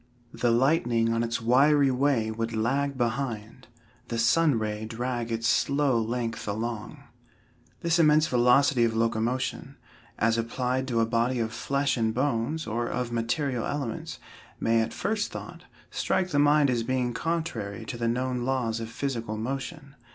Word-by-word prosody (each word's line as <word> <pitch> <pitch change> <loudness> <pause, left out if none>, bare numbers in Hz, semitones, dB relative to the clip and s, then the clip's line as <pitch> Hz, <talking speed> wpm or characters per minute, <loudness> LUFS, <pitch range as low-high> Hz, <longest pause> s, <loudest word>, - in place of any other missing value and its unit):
"The 120 - 0
lightning 120 -2 +2
on 115 - +1
its 115 +1 -1
wiry 135 +4 +4
way 125 -4 +1
would 115 +1 -3
lag 135 +5 0
behind. 120 -1 -3 0.4
The 115 - -3
sun 140 +4 +3
ray 105 -1 -3
drag 120 +1 -3
its 115 0 -1
slow 140 -4 +2
length 115 0 -3
along." 110 +1 -4 0.8
This 170 0 +2
immense 155 -1 +5
velocity 125 0 +4
of 115 -1 +1
locomotion, 115 +3 -1 0.4
as 115 +1 +2
applied 125 +3 -1
to 115 -3 +1
a - - +3
body 120 +2 0
of 115 0 -2
flesh 140 +3 0
and 110 -1 0
bones, 140 +3 -1
or 120 +2 -2
of 125 -1 -3
material 120 +2 -1
elements, 140 -6 -4 0.4
may 115 0 +2
at 110 - -2
first 205 +1 -2
thought, - - -9 0.3
strike 185 - 0
the 145 - +1
mind 145 -1 +4
as 120 -2 0
being 125 +1 -1
contrary 115 -10 -3
to 120 - -5
the 115 0 -2
known 125 +1 -1
laws 120 -3 -1
of 115 -1 -5
physical 115 -4 -3
motion. 135 +5 -5
120 Hz, 155 wpm, -27 LUFS, 115-140 Hz, 0.8 s, immense